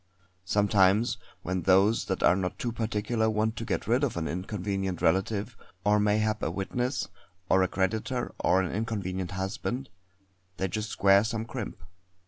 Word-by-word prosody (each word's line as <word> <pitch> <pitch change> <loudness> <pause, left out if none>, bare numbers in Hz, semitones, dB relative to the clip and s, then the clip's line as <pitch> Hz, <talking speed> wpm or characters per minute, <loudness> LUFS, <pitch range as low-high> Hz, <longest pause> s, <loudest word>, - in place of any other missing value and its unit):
Sometimes, 100 +2 +3 0.2
when 95 +1 -1
those 95 +5 +4
that 95 - -2
are 90 - +6
not 90 -2 -2
too 120 - -2
particular 110 0 0
want 110 +1 0
to - - -3
get - - -2
rid 120 +5 +2
of 135 -10 0
an 80 -1 -1
inconvenient 95 0 -3
relative 100 +6 +1 0.3
or 105 0 +4
mayhap 110 +1 +1
a - - 0
witness, 125 +6 -2 0.4
or 95 - +5
a 95 - +3
creditor, 110 +7 -1
or 95 +1 +3
an 90 - -3
inconvenient 95 -4 -3
husband 95 +8 -3 0.7
they 95 - 0
just 105 +3 -3
square 100 0 +5
some 115 0 -2
crimp. 95 - -6
105 Hz, 155 wpm, -28 LUFS, 95-110 Hz, 0.7 s, are